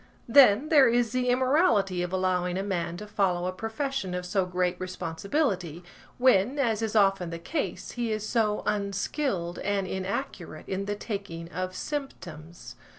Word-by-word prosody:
Then, 260 +2 +6
there 280 -6 +6
is 240 -1 +2
the 255 -1 0
immorality 250 - +2
of 180 0 -3
allowing 185 -1 0
a 190 - -1
man 175 -3 -2
to 210 - -7
follow 190 -4 0
a 185 - -1
profession 225 -1 -3
of 180 0 -4
so 185 0 0
great 180 0 0
responsibility, 185 - -2 0.3
when, 250 0 +3
as 230 -6 +1
is 225 -1 -2
often 195 -4 +3
the 165 - -5
case, 290 - -4
he 240 -2 -2
is 215 0 -2
so 215 -3 +1
unskilled 200 - -2
and 200 -1 -1
inaccurate 185 -4 -5
in 195 +1 -3
the 205 +1 -2
taking 195 -6 -6
of 185 0 -4
symptoms. 175 - -7
200 Hz, 155 wpm, -27 LUFS, 180-235 Hz, 0.3 s, Then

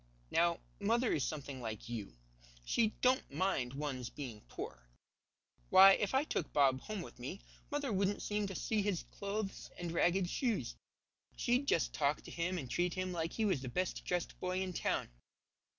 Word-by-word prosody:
Now, 170 0 +3 0.2
mother 230 +4 +2
is 145 - +1
something 140 -4 -4
like 110 -3 -5
you. 105 - -5 0.5
She 220 - +2
don't 255 - +3
mind 140 -6 0
one's 135 -4 -3
being 120 -7 -7
poor. - - -7 0.8
Why, 195 +1 +10
if 205 +4 0
I 270 - +4
took 180 - -2
Bob 135 -2 +4
home 215 -4 -4
with - - -12
me, 135 +11 -5 0.3
mother 285 -5 -1
wouldn't 195 +1 +1
seem 210 -1 0
to 195 - -6
see 215 +3 0
his 200 -4 0
clothes 200 0 -4
and 175 -1 -3
ragged 175 +2 +3
shoes. 210 - 0 0.6
She'd 250 +4 +1
just 165 - +2
talk 145 0 +1
to - - -9
him 175 +2 -1
and 140 -7 -4
treat 175 +6 0
him 185 0 -1
like 165 -1 -2
he 220 - +1
was 185 -10 +2
the 130 - -4
best 185 +8 -1
dressed 180 -1 -2
boy 185 +1 -1
in 185 -1 -4
town. - - 0
180 Hz, 180 wpm, -35 LUFS, 140-205 Hz, 0.8 s, Why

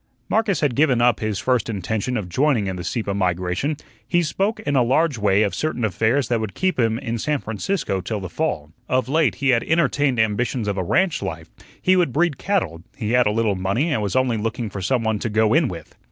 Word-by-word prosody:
Marcus 215 -4 +1
had 145 -5 +1
given 135 -2 +3
up 120 0 +3
his 110 -2 -2
first 125 -2 0
intention 110 +4 -2
of 100 -5 -4
joining 130 - +1
in 95 -1 -3
the 90 - -6
Sieppe 100 +3 -2
migration. 90 - -1 0.3
He 175 -1 +2
spoke 195 +7 -1
in 145 - -1
a 130 - +5
large 135 +2 +2
way 100 0 +3
of 100 - -1
certain 155 -7 -1
affairs 110 +5 +1
that 120 -2 +1
would 110 -3 -5
keep 185 -6 0
him 115 -2 +2
in 115 -2 -4
San 150 +5 0
Francisco 115 - -2
till 105 +3 -3
the 95 - -5
fall. 75 -2 -3 0.2
Of 130 0 +1
late 140 - +2
he 140 +7 0
had 120 -2 +3
entertained 145 -5 +1
ambitions 110 +1 0
of 100 -1 -1
a - - 0
ranch 180 - +1
life, 80 -5 -6 0.3
he 185 - +3
would 175 -7 +2
breed 160 -2 +1
cattle, 185 - -1 0.2
he 110 -2 -2
had 125 -1 +4
a - - +2
little 110 -1 +1
money 100 - 0
and 110 - 0
was 100 -3 -2
only 130 -3 +2
looking 115 0 -3
for 100 - -5
some 115 +6 0
one 110 -1 0
"to 115 - -2
go 110 +1 +2
in 160 -3 +4
with." 85 -7 -8
115 Hz, 230 wpm, -22 LUFS, 100-145 Hz, 0.3 s, a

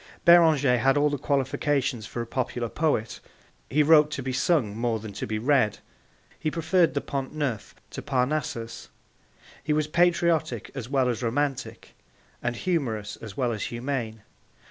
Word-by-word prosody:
Beranger 155 -7 +6
had 135 +4 +3
all 145 0 +3
the 145 - -2
qualifications 135 -3 0
for 120 - -4
a - - -8
popular 120 -1 -3
poet. 145 -8 -1 0.5
He 150 +3 +3
wrote 150 0 +6
to 135 - -4
be 130 0 -3
sung 130 - +1
more 115 0 0
than 110 -1 -8
to - - -5
be 110 +1 -2
read; 120 -2 +2 0.6
he 155 - -1
preferred 165 +1 +1
the 140 - 0
Pont 135 +1 -4
Neuf 140 -8 -3 0.2
to - - -6
Parnassus; 125 - -2 0.7
he 150 - 0
was 155 0 +1
patriotic 170 - +1
as 125 -4 -6
well 135 -2 +2
as 120 -2 -1
romantic, 135 +3 -2 0.5
and 120 0 -2
humorous 115 - -2
as 110 -4 -10
well 125 -3 +1
as 110 - -3
humane. 120 -3 -4
135 Hz, 160 wpm, -26 LUFS, 115-150 Hz, 0.7 s, Beranger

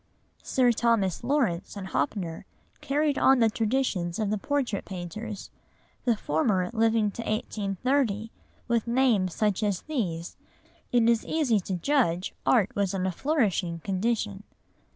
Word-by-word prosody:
Sir 250 -2 +3
Thomas 230 -5 +1
Lawrence 240 - 0
and 195 - -5
Hoppner 170 +3 -2 0.3
carried 290 +1 +1
on 270 - +5
the 225 -2 +3
traditions 215 -7 0
of 215 -2 -1
the 215 - +1
portrait 265 -6 -1
painters, 195 +4 -7 0.5
the 235 -3 +3
former 180 +3 0
living 225 -2 +2
to 230 - -6
1830; 215 +2 -1 0.4
with 235 -1 +1
names 235 -8 +2
such 210 -2 +1
as 205 -4 0
these 180 - -3 0.5
it 240 -2 +4
is 230 -1 +3
easy 275 -9 +1
to 190 0 -3
judge 185 - +1
art 215 -6 +3
was 200 -1 0
in 185 -1 -1
a 190 - +1
flourishing 200 - 0
condition. 205 +2 -1
215 Hz, 135 wpm, -27 LUFS, 190-240 Hz, 0.5 s, on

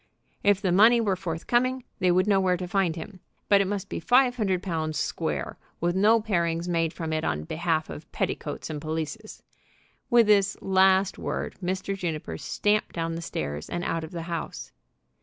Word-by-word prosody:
If 205 -1 +3
the 185 - +2
money 220 +6 +6
were 205 -4 +1
forthcoming, 240 +9 -1 0.2
they 185 -2 +2
would 185 +2 +3
know 200 -2 +3
where 185 -1 +2
to 180 0 -5
find 180 -3 +1
him; 185 +3 -8 0.3
but 200 -1 +6
it 195 - 0
must 200 -1 -3
be - - -4
five 250 +5 +4
hundred 190 -6 0
pounds 160 -4 -2
"square," - - -3 0.2
with 175 +1 0
no 215 +4 +5
parings 170 -5 -1
made 165 -2 +1
from 160 -2 -4
it 155 - -1
on 75 -1 -1
behalf 160 - -1
of 155 - -10
petticoats 150 +1 -3
and 150 -1 -5
pelisses. 160 +8 -5 0.7
With 240 -1 +6
this 200 -2 +3
last 190 0 +3
word - - -3
Mr. 190 +2 -2
Juniper 155 - -4
stamped 210 +1 0
down 165 -1 -2
the 165 - -4
stairs 75 - -4
and 175 - -3
out 165 -1 -2
of 160 - -6
the 170 -1 -6
house. 170 -1 -5
180 Hz, 185 wpm, -26 LUFS, 165-200 Hz, 0.7 s, money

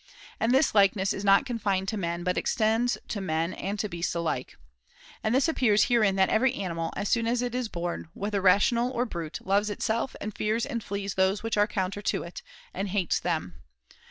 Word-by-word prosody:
And 225 - +2
this 265 +4 +3
likeness 195 -1 +3
is 195 - -5
not 200 +6 +5
con 240 -3 -3
fined 195 -2 0
to - - -2
men, 170 -3 -3
but 180 0 0
extends 225 +1 +1
to 205 - -3
men 165 -1 -1
and 200 +2 -4
to 210 - -1
beasts 175 -2 -3
alike. 160 -7 -3 0.7
And 220 +3 +1
this 270 +5 +3
appears 235 -10 +3
herein 215 -5 +3
that 190 -1 +3
every 255 +3 +2
animal, 165 -4 -3
as 205 - -2
soon 230 +1 +1
as 240 +1 +1
it 245 -1 -3
is 250 -1 -1
born, 175 -4 -4
whether 205 0 -2
rational 220 +6 +4
or 250 -1 -1
brute, 170 -7 -5
[503 - - -18
loves 205 +1 +2
itself 220 +4 -2
and 215 0 -5
fears 220 +2 0
and 240 -6 -4
flees 200 0 -4
those 190 +2 +1
things - - -18
which 225 - -1
are 205 0 +4
counter 200 -1 -2
to - - -1
it, 170 - -8 0.3
and 195 +2 -3
hates 190 -2 0
them. 155 - -3
205 Hz, 215 wpm, -27 LUFS, 185-230 Hz, 0.7 s, not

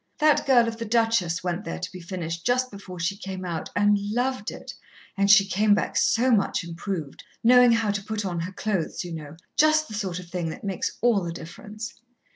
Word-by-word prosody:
That 305 -2 +3
girl 245 -3 +5
of 225 0 -4
the 230 - -4
Duchess 225 -7 +1
went 180 +2 -2
there - - -5
to 180 - -5
be 185 - -9
finished 170 -2 -5
just 255 +1 +1
before 195 -3 -9
she 175 +4 -1
came 190 -2 -6
out, 170 -3 -4
and 205 0 +4
loved 230 +2 -1
it, - - -9 0.4
and 200 0 +2
she 200 -1 +8
came 205 +1 +3
back - - -2
so 250 +3 +3
much 200 -5 +2
improved 170 -2 -5 0.2
knowing 245 +1 +7
how 225 -2 +1
to 200 0 -3
put 215 0 -3
on 175 -3 -2
her 175 +4 -4
clothes, 190 -4 -2
you 175 - -6
know... 155 -1 -8 0.2
just 310 0 +4
the 215 - -9
sort 195 -4 -3
of 180 -1 -8
thing 170 -1 -3
that - - -8
makes 195 -3 -3
all 230 -5 +3
the 170 - -3
difference." 205 +7 -8
200 Hz, 215 wpm, -25 LUFS, 175-225 Hz, 0.4 s, she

